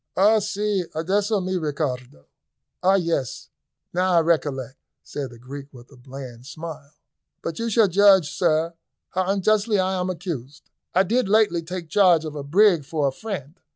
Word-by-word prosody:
"Ah 210 +4 +5
si, 210 -2 -1
adesso 200 +6 +1
me 185 0 -1
ricordo! 130 - -4 0.6
Ah 190 +2 +4
yes, 165 -8 -2 0.4
now 180 +1 +1
I 170 - +5
recollect," 145 -6 -1 0.2
said 140 -3 -5
the 120 - -13
Greek, 140 +4 -9
with 125 0 -15
a - - -15
bland 130 -1 -10
smile. 155 -1 -9 0.5
"But 165 - -4
you 230 0 -1
shall 220 -1 +4
judge, 190 -4 +5
sir, 165 -1 +1 0.4
how 185 0 -1
unjustly 205 +2 +2
I 190 0 +1
am 180 +1 -1
accused. 155 -7 -6 0.2
I 190 - +5
did 225 +2 0
lately 205 -5 +3
take 175 0 -6
charge 175 -3 +4
of 155 - -5
a 150 - -5
brig 175 +3 +4
for 145 0 -1
a - - 0
friend. 180 -2 -7
170 Hz, 165 wpm, -23 LUFS, 145-195 Hz, 0.6 s, Ah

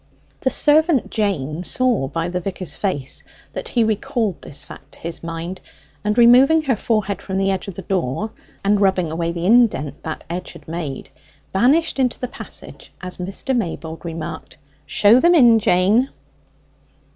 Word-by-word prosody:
The 260 - +1
servant 305 0 +3
Jane 175 - -1
saw 240 - +1
by 165 +4 -2
the 180 +1 -2
vicar's 185 -1 -4
face 145 -10 -2 0.3
that - - -5
he 235 - +2
recalled 220 - -1
this 140 - -6
fact 135 +1 -13
to - - -13
his 165 0 -6
mind; 170 +2 -6 0.4
and 210 +2 0
removing 255 +7 +6
her 265 -5 +1
forehead 210 -3 -1
from 190 -1 -4
the 195 0 +2
edge 190 0 -3
of 195 - -6
the 190 - -7
door, 185 - -2 0.3
and 200 +1 +2
rubbing 190 -4 +2
away 165 +1 -1
the 170 0 -4
indent 210 - +3
that 160 - -6
edge 175 +2 -5
had - - -15
made, 160 -5 -5 0.4
vanished 275 +10 +3
into 250 -2 +1
the 250 - -3
passage - - -9
as 180 -1 -7
Mr. 195 +8 -2
Maybold 165 -7 -4
remarked, 165 -1 -6 0.3
"Show 215 +4 +5
them 345 +5 +5
in, 240 -7 +7
Jane." 210 +7 +3
195 Hz, 165 wpm, -20 LUFS, 170-240 Hz, 0.4 s, in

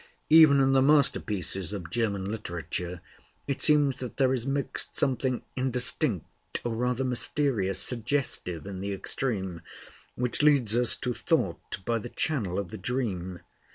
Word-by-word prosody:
Even 155 -3 +8
in 135 0 +3
the 135 0 +4
masterpieces 110 - +2
of 90 -5 -6
German 100 -4 -1
literature 90 -4 -5 0.4
it 140 - -3
seems 145 -3 +5
that 125 -3 -7
there 130 -1 +3
is 125 0 -2
mixed 140 0 -2
something 130 -1 +1
indistinct, 125 -1 -2
or 120 - -1
rather 125 +2 -1
mysterious, 125 -6 0
suggestive 115 - -1
in 95 -2 -6
the 100 +1 -3
extreme, 95 -3 -2 0.5
which 125 +2 -1
leads 140 -7 +4
us 120 0 +3
to 125 -2 -3
thought 95 - -2
by 115 -1 0
the 120 - -7
channel 115 - -1
of 100 -2 -3
the 110 - -7
dream. 95 -6 -3
120 Hz, 145 wpm, -28 LUFS, 95-135 Hz, 0.5 s, Even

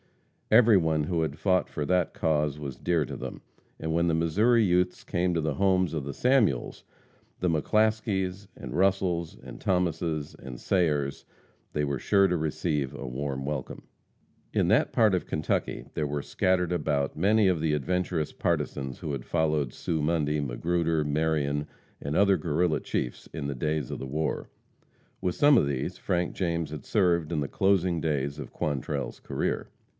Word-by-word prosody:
Every 115 -1 +7
one 80 -3 +1
who 85 +2 0
had 75 -2 -2
fought 90 +3 +1
for 75 - -3
that 90 +2 +1
cause 75 -2 0
was 70 -4 -5
dear 85 -4 0
to - - -6
them, - - -7 0.4
and 80 0 -2
when 85 +1 +2
the 85 - +2
Missouri 105 +9 +3
youths 90 -1 +1
came 90 0 0
to 85 - +1
the 80 -2 0
homes 95 0 +2
of 75 -3 -2
the 70 +1 -5
Samuels, 120 - +1 0.6
and 90 -2 +2
McClaskeys, 100 +1 0
and 60 - -7
Russels, 95 -3 +1
and - - -10
Thomases, 85 -4 -1
and 60 -2 -9
Sayers, 75 -7 0 0.5
they 75 -1 0
were 70 -2 -2
sure 100 -1 +4
to 90 - 0
receive 75 -3 -1
a 70 - -6
warm 70 +1 -3
welcome. 70 -3 -4 0.7
In - - +2
that - - +3
part 110 -4 +4
of 90 - -3
Kentucky 75 0 -2
there 75 - -1
were 70 0 -3
scattered 90 -1 +1
about 70 -4 0
many 105 +5 +3
of 90 -4 +1
the 80 -1 +1
adventurous 85 +1 -1
partisans 65 -2 -2
who 75 - -4
had 65 -3 -4
followed 75 -4 0
Sue 80 -3 -2
Mundy, 75 -1 +1
Magruder, 80 +4 0
Marion 75 -1 0 0.3
and 70 +2 -2
other 100 -1 +5
Guerrilla 80 0 0
chiefs - - -3
in - - -5
the 70 - -3
days 75 0 -2
of - - -4
the 65 - -5
war. 75 +3 -2 0.7
With 90 -2 -1
some 145 -2 +6
of 70 - +3
these 70 -2 -3
Frank 90 -1 -1
James 85 -4 -2
had 75 -2 -7
served 85 -6 +2
in 80 - 0
the 70 - -1
closing 95 -3 +2
days 70 -2 -1
of 70 - -7
Quantrell's 70 -1 -3
career. - - -2
80 Hz, 170 wpm, -28 LUFS, 75-90 Hz, 0.7 s, Every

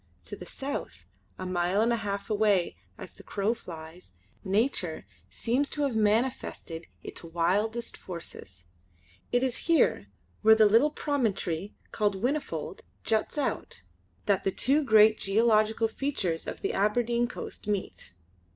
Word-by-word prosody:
To - - -6
the - - -10
south, 85 0 -5 0.3
a 185 - -5
mile 180 +1 +1
and 230 +2 +3
a - - +1
half 200 -2 -3
away 205 -4 +2 0.2
as - - -9
the - - -14
crow 205 +2 -1
flies, 165 - -11 0.3
Nature 195 -4 0 0.2
seems 260 +5 0
to 295 - -2
have 270 -5 0
manifested 215 -6 0 0.2
its - - -8
wildest 190 +8 0
forces. 165 - -9 0.7
It 245 +1 +2
is 255 +2 -2
here, 330 - +3 0.3
where 220 0 +7
the 220 -1 +6
little 230 +8 +5
promontory 210 - -1 0.2
called 205 -2 +1
Whinnyfold 260 +9 -2 0.2
juts 220 +6 0
out, 265 - -2 0.4
that 200 -2 +2
the - - +2
two 275 +10 +2
great 220 -3 +6
geological 220 +2 +3
features 220 - -2
of - - -5
the - - -1
Aberdeen 235 +4 +1
coast 240 - -8
meet. 200 - -3
215 Hz, 140 wpm, -28 LUFS, 185-235 Hz, 0.7 s, where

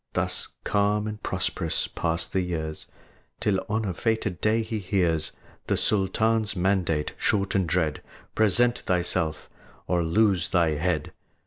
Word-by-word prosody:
Thus - - -1 0.2
calm 105 +1 +1
and 105 0 -5
prosperous - - -1
pass 85 0 -1
the 95 - -1
years, 80 -3 -4 0.5
Till 95 -2 +1
on 110 +1 0
a 95 - -1
fated 105 -2 -1
day 110 +1 +2
he 110 0 -3
hears 90 -5 0 0.4
The - - +1
Sultan's 110 +2 +1
mandate, 90 -5 +1
short 100 -1 +1
and 95 -4 +1
dread, 80 -3 0 0.3
"Present 120 +3 +3
thyself, 85 -3 -1 0.4
or 90 -1 +1
lose 95 +1 +2
thy 85 -3 +3
head!" 80 +1 -1
95 Hz, 135 wpm, -26 LUFS, 85-105 Hz, 0.5 s, Present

